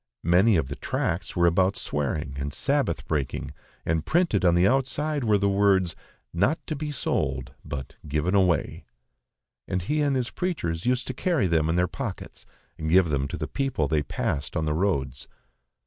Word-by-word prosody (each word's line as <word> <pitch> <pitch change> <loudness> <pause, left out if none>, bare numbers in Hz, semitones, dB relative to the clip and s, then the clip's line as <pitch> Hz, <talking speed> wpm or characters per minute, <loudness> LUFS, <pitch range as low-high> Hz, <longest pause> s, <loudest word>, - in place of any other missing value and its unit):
Many 90 +6 +4
of 80 -6 +1
the 70 - -5
tracts 85 +3 -2
were 85 -1 +3
about 95 +3 +3
swearing 75 0 -2
and 70 +1 -3
Sabbath - - 0
breaking, 70 -4 -2 0.3
and 80 -1 0
printed 160 - +2
on 85 -2 +5
the 90 +1 +4
outside 140 +3 +1
were 105 -3 +3
the 100 0 +1
words, 95 -3 +3 0.4
"Not 100 - +2
to 155 - -3
be 150 +1 -4
sold, 65 - -2
but 65 -2 -7
given 75 +5 0
away"; 95 -4 +1 0.8
and 90 - -1
he 150 +10 0
and 140 -2 +2
his 125 -2 -1
preachers 95 - -2
used 125 0 +1
to 130 - -4
carry 160 - +1
them 80 -3 +2
in 80 - +1
their 90 0 +2
pockets - - -7 0.3
and 80 0 -2
give 90 0 +5
them 70 -2 0
to - - -5
the 75 0 -3
people 135 - -1
they 75 0 +1
passed 70 0 -2
on 80 - 0
the 75 - 0
roads. 70 -8 -1
90 Hz, 180 wpm, -26 LUFS, 75-120 Hz, 0.8 s, on